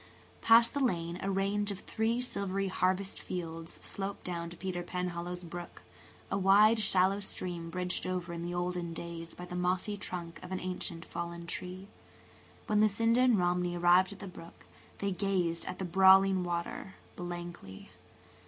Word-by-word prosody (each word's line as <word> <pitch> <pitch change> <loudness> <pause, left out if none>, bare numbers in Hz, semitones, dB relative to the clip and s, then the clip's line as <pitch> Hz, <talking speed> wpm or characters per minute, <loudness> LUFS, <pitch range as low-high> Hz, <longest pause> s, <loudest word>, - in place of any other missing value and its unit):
Past 230 +1 +6
the 285 - -1
lane 170 -6 -1
a 195 - -1
range 200 +2 0
of 200 -1 -5
three 225 +2 0
silvery 195 -5 -1
harvest 185 +1 0
fields 165 -2 -5
sloped 200 0 -4
down 170 -2 -4
to 170 - -10
Peter 185 -2 -3
Penhallow's 180 0 -4
brook–a 175 +3 -8
wide, 210 +4 +6
shallow 195 -1 +4
stream 175 -4 -4
bridged 180 +2 -2
over 180 -1 -3
in 170 - -5
the 175 +1 -3
olden 175 -1 -2
days 165 0 -7
by 180 - -7
the 180 0 -7
mossy 180 +3 0
trunk 170 -4 -6
of 180 - -9
an 185 - -2
ancient 175 -2 -4
fallen 170 0 -5
tree. 180 +3 -4 0.8
When 210 0 +2
Lucinda 225 +3 +3
and 250 -4 +5
Romney 175 -1 +1
arrived 175 +2 +5
at 200 - -9
the 200 - -8
brook, 170 -2 -12 0.3
they 200 0 -1
gazed 180 -3 0
at 185 - -4
the 190 - -3
brawling 190 +1 +6
water 175 +2 -4 0.2
blankly. 175 - -7
180 Hz, 160 wpm, -32 LUFS, 175-195 Hz, 0.8 s, Past